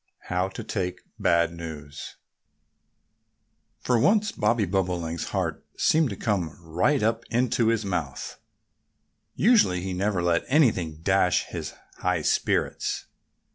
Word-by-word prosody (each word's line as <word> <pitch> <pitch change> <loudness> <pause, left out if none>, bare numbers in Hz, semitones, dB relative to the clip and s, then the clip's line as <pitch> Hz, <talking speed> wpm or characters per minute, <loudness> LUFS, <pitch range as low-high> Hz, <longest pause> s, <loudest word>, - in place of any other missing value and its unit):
XXI - - -25
HOW 90 +1 +1
TO 95 - -7
TAKE 90 -3 -3 0.2
BAD 85 0 +2
NEWS 75 -4 -8 1.7
FOR 125 -2 +2
once 210 - +3
Bobby 105 0 +1
Bobolink's 85 -3 -1
heart - - -2
seemed 155 -3 +3
to 100 - -4
come 90 -7 -2
right 90 - +1
up 115 +1 +1
into 120 -1 +1
his 115 -2 +1
mouth. 85 -9 -4 1.0
Usually 205 - +4
he 95 0 -3
never 95 -1 0
let 85 -1 +2
anything 95 - +2
dash 95 -2 +3
his - - -6 0.2
high - - 0
spirits. - - 0
95 Hz, 125 wpm, -26 LUFS, 85-115 Hz, 1.7 s, Usually